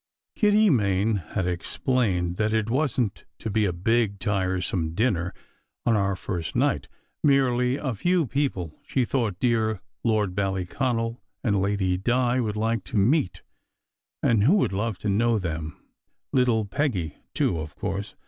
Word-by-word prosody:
Kitty 210 -1 +4
Main 105 -3 +2
had 95 +2 -3
explained 90 0 0
that 110 0 +1
it 110 0 0
wasn 130 -5 +1
t - - -20 0.2
to 110 - -4
be 110 +1 +2
a 95 - +1
big, 100 +4 +1
tiresome 95 -4 -1
dinner 90 -6 +1 0.5
on 115 - +3
our 100 -2 +1
first 90 -3 -4
night: - - +1 0.4
merely 130 -3 +3
a 135 -3 -2
few 175 - +1
people 115 - -2
she 130 -3 0
thought 110 -7 -1
dear 110 -4 +1 0.2
Lord 110 -5 +1
Ballyconal 115 +5 -1 0.2
and 100 -6 +2
Lady 95 -2 0
Di 125 +4 +2
would 110 -3 -1
like 110 -1 0
to - - -3
meet, 110 - +2 0.8
and 110 -4 +3
"who 150 - +5
would 195 - +2
love 105 +1 -1
to 105 - -5
know 115 +3 +2
them 80 -5 -4 0.6
little 120 -4 +3
Peggy, 100 - -1 0.2
too, 85 - +1
of 75 -1 -7
course!" 100 0 -4
110 Hz, 150 wpm, -25 LUFS, 95-125 Hz, 0.8 s, who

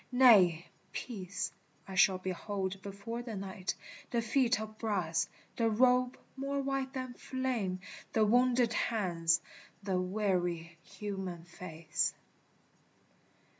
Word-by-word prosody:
Nay, 200 -10 +7 0.3
peace, 200 -6 -4 0.4
I 195 - -7
shall 190 0 +5
behold 190 +1 -3
before 200 +4 -5
the 235 -3 -6
night, 190 -1 -3 0.3
The 235 -1 0
feet 240 0 +3
of 215 0 -7
brass, 185 -7 0 0.3
the 230 -1 +3
robe 250 +3 +4 0.2
more 275 +1 -2
white 270 -1 -1
than 255 -1 -4
flame, 240 -9 -2 0.3
The 220 -1 +4
wounded 245 +1 +4
hands, 170 -8 +2 0.4
the 190 -2 +1
weary 180 -4 -1
human 190 -4 -5
face. 170 -2 -2
205 Hz, 110 wpm, -33 LUFS, 185-245 Hz, 0.4 s, Nay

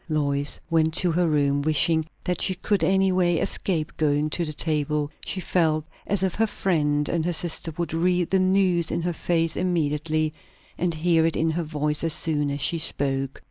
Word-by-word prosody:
Lois 145 -2 0
went 160 -1 +1
to 180 -1 +4
her 175 +1 +1
room, 145 -2 +1
wishing 155 +2 +2 0.2
that 180 - -2
she 190 - +2
could 190 0 -1
any 190 +2 +3
way 175 -2 +2
escape 160 -1 -2
going 150 0 +1
to 175 - -1
the 155 - -3
table; 150 -1 0 0.2
she 190 - -3
felt 160 -4 0 0.2
as 200 -2 0
if 190 -2 0
her 225 +1 +1
friend 150 -8 0
and 170 -2 -1
her 175 - 0
sister 165 0 0
would 170 -3 -3
read 175 +1 +1
the 190 - +3
news 185 -3 +2
in 170 - -2
her 175 0 -1
face 165 -1 0
immediately, 155 -3 0 0.4
and 175 -1 -1
hear 165 0 +2
it 165 0 +1
in 160 +1 +1
her 170 +2 -2
voice 150 -1 -1
as 165 -2 +4
soon 150 -3 0
as 140 0 -3
she 170 - +1
spoke. 135 -3 -1
160 Hz, 195 wpm, -24 LUFS, 150-175 Hz, 0.4 s, to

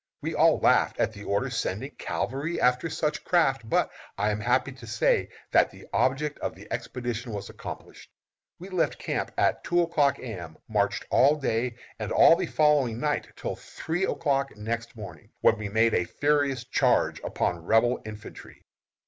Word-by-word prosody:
We - - -4
all - - +4
laughed - - +3
at 110 - +1
the 100 -1 -10
order 100 0 0
sending 125 +10 -3
cavalry 140 +7 -3
after 125 +6 +2
such 150 0 -2
craft, 135 -10 +2
but - - +2 0.3
I 105 +2 +1
am 105 - -2
happy 125 +4 +1
to 125 -3 -12
say 110 0 +1 0.2
that - - +5
the - - -14
object 140 +3 +1
of - - -3
the - - -13
expedition 120 -1 -4
was 100 -1 -6
accomplished. - - -9 0.5
We 185 +3 -10
left 185 -3 0
camp - - -3
at - - +2
two 175 0 +2
o'clock 150 -4 +2
A. - - -12
M., 90 -10 -7
marched 105 -2 0
all 140 +3 +5
day 120 -4 -1 0.2
and 105 -2 -4
all 165 - +7
the 180 0 -2
following 145 -8 +2
night, 150 0 -1
till - - -4
three 175 +4 -3
o'clock 140 - -1
next 115 +2 -4
morning, 95 -8 -10
when 110 - +4
we 105 -2 -4
made 110 +2 +3
a 90 - +2
furious 140 +4 +1
charge 130 - +2
upon 85 -2 -2
Rebel 115 +6 +3
infantry. 105 0 -10
125 Hz, 175 wpm, -27 LUFS, 110-145 Hz, 0.5 s, all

